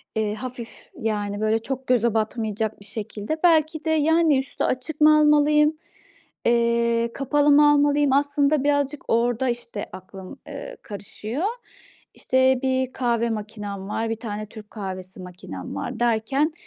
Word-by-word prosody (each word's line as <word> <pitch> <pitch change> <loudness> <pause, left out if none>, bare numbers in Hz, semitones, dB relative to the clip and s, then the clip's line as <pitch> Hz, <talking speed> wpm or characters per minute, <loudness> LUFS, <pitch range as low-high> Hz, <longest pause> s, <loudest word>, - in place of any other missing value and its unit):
eee, 215 -1 0
hafif, 250 -1 -9
yani, 205 -2 -2
böyle, 215 +1 +2
çok 265 +2 -5
göze 235 -3 +2
batmayacak 220 -1 -2
bir 200 - -14
şekilde, 210 +6 -5
belki 315 -2 +3
de, - - 0
yani, 315 -1 +3
üstü 270 - -4
açık 260 +5 -2
mı 305 0 +7
almalıyım, 300 +1 +4 0.7
eee, 235 0 +2
kapalı 290 +2 +2
mı 295 +1 +7
almalıyım? 290 -1 +3
Aslında 285 0 +2
birazcık 285 0 0
orada, 240 +2 +1
işte, 235 -3 -5
aklım, 190 +6 -10
eee, - - -8
karışıyor. 215 - -5 0.7
İşte, 260 0 +2
1 260 -1 0
kahve 235 -2 0
makinam 210 -3 -5
var, 225 +2 -2
1 225 - -1
tane 215 -2 -5
Türk 210 -1 -12
kahvesi 190 -3 -7
makinam 135 - -8
var 100 - -5
derken, 240 +7 +1
240 Hz, 140 wpm, -23 LUFS, 215-285 Hz, 0.7 s, mı